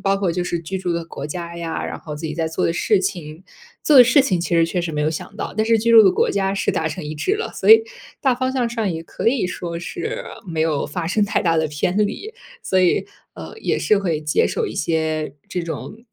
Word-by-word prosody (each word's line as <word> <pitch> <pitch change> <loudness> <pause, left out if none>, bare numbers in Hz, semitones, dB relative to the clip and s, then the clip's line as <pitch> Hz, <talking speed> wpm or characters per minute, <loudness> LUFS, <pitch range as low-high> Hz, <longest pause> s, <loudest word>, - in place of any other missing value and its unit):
包 195 0 +2
括 195 -3 0
就 180 +1 -1
是 175 - -2
居 180 +4 -5
住 180 -2 -2
的 170 0 -2
国 145 -3 -8
家 170 +2 -6
呀， 165 -1 -4
然 - - -5
后 150 - -7
自 160 - -9
己 155 - -4
在 165 0 -1
做 160 - -2
的 165 - +2
事 195 +3 +2
情。 160 -3 -4 0.4
做 300 - +6
的 255 - +12
事 255 +4 +5
情 190 -10 +1
其 170 - -3
实 165 0 +4
确 180 +2 -1
实 170 - -3
没 150 -1 -2
有 150 - +2
想 155 - -6
到， - - -5
但 220 - +2
是 225 0 +3
居 230 +2 +2
住 225 -1 +10
的 190 - +6
国 - - +1
家 195 -1 0
是 200 - 0
达 160 - -1
成 165 +2 -6
一 150 +1 -5
致 375 - 0
了， 450 - -4
所 - - +2
以 445 0 +9 0.4
大 260 -3 +3
方 260 +1 -1
向 255 -2 0
上 225 -4 -2
也 160 - -4
可 225 - -1
以 235 -5 +1
说 170 -2 -5
是 170 - -5 0.2
没 165 -4 -4
有 155 -3 +1
发 165 +2 -4
生 205 +4 +2
太 205 - 0
大 165 -2 +2
的 160 -1 +1
偏 150 +5 -1
离。 420 - -5 0.3
所 190 - +2
以， 180 - +2 0.3
呃， - - -9
也 - - 0
是 215 - +3
会 170 -6 -1
接 150 -1 +1
受 - - -1
一 - - -6
些 155 -3 -1 0.2
这 180 - -3
种 215 +7 -7
175 Hz, 285 characters per minute, -21 LUFS, 160-215 Hz, 0.4 s, 的